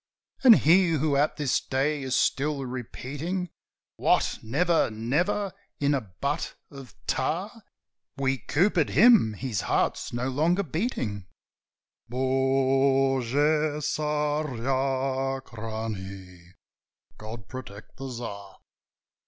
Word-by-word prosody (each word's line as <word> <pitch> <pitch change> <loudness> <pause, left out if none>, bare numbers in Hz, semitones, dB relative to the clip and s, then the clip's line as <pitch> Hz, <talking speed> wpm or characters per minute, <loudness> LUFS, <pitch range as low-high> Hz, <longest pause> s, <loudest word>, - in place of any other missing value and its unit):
"And 245 -4 +10
he 175 +1 +4
who 150 -1 +1
at 145 +2 +1
this 145 -3 +1
day 140 +3 -1
is 130 -1 -1
still 140 -1 +1
repeating, 145 +8 -5 0.5
'What, - - +2
never, 165 +9 +2
never?'" 155 - -1 0.3
"In 145 0 +2
a 140 - +1
butt 110 +8 -4 0.2
of 135 -5 -11
tar - - -2 0.6
We 135 -1 0
coopered 160 - +2
him. 210 - +6
His 115 -3 -3
heart's - - 0
no 120 +2 -2
longer 165 +8 +1
beating: 130 - -3 0.8
Bogu 135 +3 +2
Tsarachnie! 130 - -2 0.7
God 110 -2 -8
protect 110 -5 -10
the 135 0 -6
Tsar!" 100 -5 -7
135 Hz, 95 wpm, -27 LUFS, 120-150 Hz, 0.8 s, And